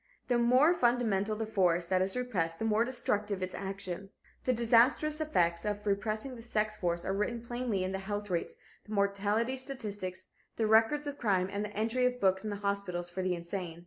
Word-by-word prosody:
The 245 -1 +3
more 255 +8 +5
fundamental 230 - +1
the 225 +1 -2
force 180 -5 +2
that 185 -1 +3
is 190 +5 0
repressed 180 -10 -1
the 225 - -2
more 220 +1 +3
destructive 210 -5 -1
its 185 - -4
action. 195 -1 -5 0.4
The 255 - +3
disastrous 250 +6 +3
effects 170 - +1
of 205 0 -3
repressing 215 +5 -1
the 230 - -10
sex 215 -2 -1
force 175 -3 -2
are 190 - 0
written 210 +4 -1
plainly 240 -5 -2
in 185 - -2
the 190 - -2
health 205 +1 -4
rates, 170 -1 -1 0.3
the 215 - -6
mortality 205 +5 +1
statistics, 205 -9 -5 0.3
the 225 - 0
records 225 +7 +4
of 285 0 -5
crime 190 -4 +1
and 200 +1 -2
the 210 - -6
entry 230 +4 +1
books 190 -6 +1
of 215 - -3
the 205 - -3
hospitals 200 -3 -2
for 185 - -3
the 185 -1 0
insane. 170 -1 -5
210 Hz, 195 wpm, -31 LUFS, 190-235 Hz, 0.4 s, more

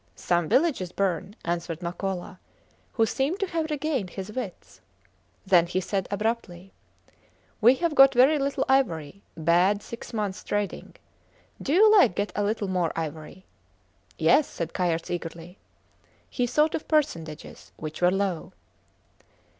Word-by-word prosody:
Some 175 -3 0
villages 265 - +1
burn, 195 +1 -2
answered 170 -1 -3
Makola, 185 +1 -4 0.5
who 225 - +3
seemed 280 - -1
to - - +2
have 330 -3 -3
regained 290 - -2
his 195 +3 -7
wits. 200 - -7 0.6
Then 175 -3 +4
he 180 +2 -1
said 190 0 -2
abruptly: 200 -3 -3 0.9
We 240 +4 +7
have 335 +2 -1
got 270 -2 +7
very 275 +5 +5
little 275 -1 -1
ivory; 195 - 0 0.2
bad 175 +5 +2
six 235 - -9
months 210 -4 -3
trading. 205 -1 -3 0.7
Do 280 - -3
you 425 +7 +6
like 255 - +5
get 205 +1 -2
a 205 - 0
little 210 0 -1
more 180 -3 0
ivory? 160 +3 -6 0.7
Yes, 305 - +4
said 165 -1 -5
Kayerts, 170 -2 -1
eagerly. 175 +1 -6 0.7
He 245 -2 0
thought 300 +5 +2
of - - -4
percentages 165 - -2
which 155 +1 -7
were 175 - +5
low. 195 -3 -2
195 Hz, 140 wpm, -26 LUFS, 175-265 Hz, 0.9 s, We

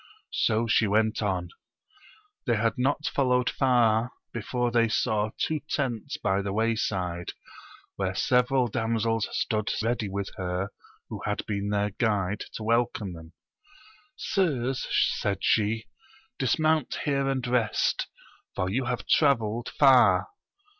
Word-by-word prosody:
So 115 0 +1
she 110 -1 +3
went 110 +2 +1
on. 95 -4 -1 1.0
They 120 - +3
had 115 +1 +1
not 145 +4 0
followed 125 -4 +1
far 120 -3 +3 0.2
before 120 +2 -1
they 115 -1 +3
saw 110 -2 +1
two 155 -1 -1
tents 125 -7 -2
by 95 +1 0
the 100 0 -3
wayside, 95 -5 -1 0.6
where 95 -1 -1
several 125 +3 +2
damsek 115 0 -1
stood 110 -1 -1
ready 115 -3 -1
with 100 0 -4
her 90 +1 -2 0.4
who - - -6
had - - -2
been 100 -1 -2
their 105 0 0
guide 105 -2 -1
to 110 - -5
welcome 115 -4 0
them. 80 0 -12 0.8
Sirs, 135 - -1 0.3
said 100 -1 -1
she, 110 +1 +2 0.5
dismount 155 -3 +1
here 140 -1 +1
and 130 -2 -1
rest, 120 -3 +1 0.5
for 90 0 -1
you 130 +4 0
have 125 0 -3
travelled 120 -5 +2
far. 125 -9 +5
115 Hz, 125 wpm, -27 LUFS, 100-125 Hz, 1.0 s, far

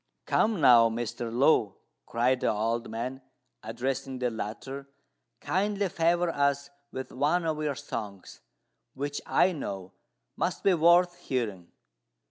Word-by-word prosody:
"Come 215 -3 +2
now, 120 -5 +7
Mr. 115 0 -4
Lu," 120 - +3 0.3
cried 125 +2 +1
the 130 - +1
old 115 +2 -1
man, 125 +4 -4 0.4
addressing 130 +4 -3
the 125 -1 -1
latter, 130 +6 -6 0.5
"kindly 200 +1 0
favour 170 +1 +1
us 140 -1 0 0.2
with 130 0 -6
one 150 +6 +1
of 155 -1 -1
your 150 -2 -1
songs, 105 -8 -7 0.5
which, 145 +2 -3
I 185 - +4
know, 95 - -6 0.4
must - - -2
be 195 - +5
worth 175 +1 +4
hearing." 105 -9 -3
130 Hz, 125 wpm, -28 LUFS, 115-160 Hz, 0.5 s, now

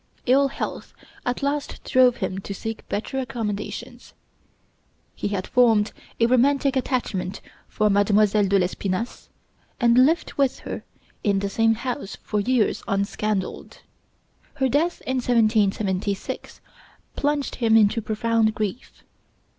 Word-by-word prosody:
Ill 275 +3 +4
health 275 - -6 0.3
at 245 +3 -1
last 285 +1 -2
drove 255 -1 +4
him 190 0 -3
to 195 +1 -6
seek 225 +3 -6
better 225 +6 -2
accommodations. 230 0 -5 1.0
He - - -3
had 200 -2 -2
formed 225 -4 +3 0.3
a 230 - +5
romantic 270 +3 +3
attachment 235 -7 -2 0.3
for 215 - +1
Mademoiselle 205 0 +3
de 200 +1 +3
l'Espinasse, 185 +4 -2 0.5
and 240 +1 +5
lived 320 +5 +1
with 275 -2 +1
her - - -6 0.4
in 200 -2 +2
the 200 0 -1
same 225 +1 +3
house 240 -2 -4
for 210 - -1
years 235 +1 +1
unscandaled. 200 0 -2 0.7
Her 265 - +1
death 310 +7 0
in 260 - -1
1776 210 -5 0 0.5
plunged 290 -1 -1
him 225 -2 +4
into 215 +1 +3
profound 220 0 +1
grief. 215 +2 -5
225 Hz, 125 wpm, -24 LUFS, 205-255 Hz, 1.0 s, a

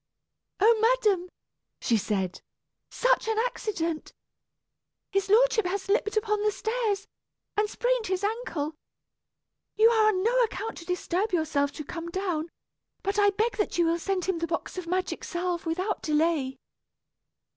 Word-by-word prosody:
"Oh, 440 +2 +5
madam!" 435 -6 +3 0.5
she 235 - +2
said, 195 -4 -1 0.5
"such - - +2
an 445 -1 0
accident! 375 -9 -2 1.0
His 390 0 0
lordship 445 -2 +4
has 385 +2 -2
slipped 420 +1 +1
upon 425 -1 +1
the 425 0 +2
stairs, 435 -2 -1 0.5
and 420 0 +1
sprained - - 0
his 375 +1 -1
ankle. 405 -9 -2 1.0
You 445 +2 +6
are 440 -2 +4
on 375 -3 +2
no 465 +3 +2
account 450 -1 -2
to 335 - -11
disturb 360 +3 -1
yourself 305 -4 +1
to 305 - -6
come 335 +3 -6
down; 345 -3 -2 0.5
but 400 +1 0
I 405 0 +6
beg 425 +2 0
that 420 - -1
you 345 - +4
will 335 +1 +1
send 375 0 -1
him 375 -3 0
the 335 - -1
box 330 0 -3
of 365 -2 -5
magic 370 +2 -1
salve 350 -1 -2
without 370 +6 -1
delay." 300 -4 +1
390 Hz, 150 wpm, -27 LUFS, 335-435 Hz, 1.0 s, You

